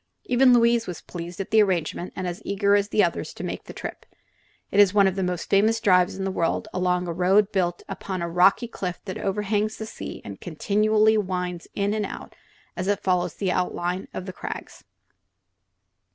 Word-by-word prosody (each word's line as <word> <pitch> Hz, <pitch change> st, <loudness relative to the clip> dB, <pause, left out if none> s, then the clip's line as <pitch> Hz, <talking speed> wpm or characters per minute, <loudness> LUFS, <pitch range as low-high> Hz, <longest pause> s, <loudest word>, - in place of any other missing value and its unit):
Even 250 Hz, +1 st, +4 dB
Louise 235 Hz, -1 st, +4 dB
was 180 Hz, -3 st, -6 dB
pleased 175 Hz, +1 st, -8 dB
at 195 Hz, -, -5 dB
the 220 Hz, -, +6 dB
arrangement 180 Hz, -2 st, -1 dB
and 185 Hz, -, -4 dB
as 175 Hz, 0 st, -4 dB
eager 200 Hz, 0 st, +1 dB
as 205 Hz, 0 st, +1 dB
the 215 Hz, -1 st, +3 dB
others 170 Hz, -, -2 dB
to -, -, -7 dB
make -, -, -5 dB
the -, -, -9 dB
trip. -, -, -7 dB, 0.7 s
It 200 Hz, -, +2 dB
is 205 Hz, -1 st, +6 dB
one 200 Hz, -1 st, +6 dB
of 190 Hz, -1 st, +1 dB
the 195 Hz, -, -1 dB
most 180 Hz, -2 st, -2 dB
famous 215 Hz, +3 st, +3 dB
drives 180 Hz, -5 st, +3 dB
in 190 Hz, -, -4 dB
the 195 Hz, -, -1 dB
world, 165 Hz, -3 st, -1 dB
along 180 Hz, -1 st, 0 dB
a 170 Hz, -, -2 dB
road 190 Hz, +4 st, +3 dB
built 175 Hz, -3 st, -1 dB
upon 185 Hz, -2 st, -5 dB
the 170 Hz, -, -1 dB
rocky 180 Hz, +7 st, +3 dB
cliff 180 Hz, -6 st, -5 dB
that 190 Hz, -, -5 dB
overhangs 210 Hz, +2 st, -1 dB
the 220 Hz, -, -5 dB
sea -, -, -7 dB
and 100 Hz, -1 st, -8 dB
continually 215 Hz, +5 st, +2 dB
winds 180 Hz, -3 st, -3 dB
in 200 Hz, 0 st, 0 dB
and 210 Hz, -2 st, -1 dB
out -, -, -9 dB, 0.4 s
as 185 Hz, -, -3 dB
it 205 Hz, 0 st, 0 dB
follows 180 Hz, -3 st, +1 dB
the 190 Hz, -3 st, -1 dB
outlines 180 Hz, 0 st, -2 dB
of 185 Hz, -, -6 dB
the 185 Hz, -, -6 dB
crags. -, -, -7 dB
190 Hz, 200 wpm, -25 LUFS, 180-210 Hz, 0.7 s, the